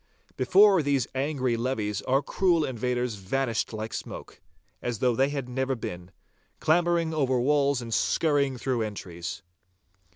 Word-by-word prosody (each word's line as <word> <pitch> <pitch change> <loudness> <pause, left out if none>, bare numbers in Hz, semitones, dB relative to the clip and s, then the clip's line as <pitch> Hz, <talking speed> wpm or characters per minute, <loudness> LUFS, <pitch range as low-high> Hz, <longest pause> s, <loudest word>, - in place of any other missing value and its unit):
Before 190 +7 +5
these 140 -4 +1
angry 130 -3 0
levies 115 -4 -2
our 135 +2 +2
cruel 170 -1 +2
invaders 125 -1 -2
vanished 115 +4 -1
like 110 0 -5
smoke, - - -7 0.4
as 120 -2 -2
though 125 +2 +2
they 135 +3 +2
had 140 -3 -4
never 130 +1 -1
been, 90 -6 -7 0.5
clambering 170 0 +2
over 130 -5 +1
walls 140 0 +2
and 115 -1 -5
scurrying 140 -3 +1
through 125 -1 -1
entries. 90 -5 -5
130 Hz, 135 wpm, -27 LUFS, 115-145 Hz, 0.5 s, Before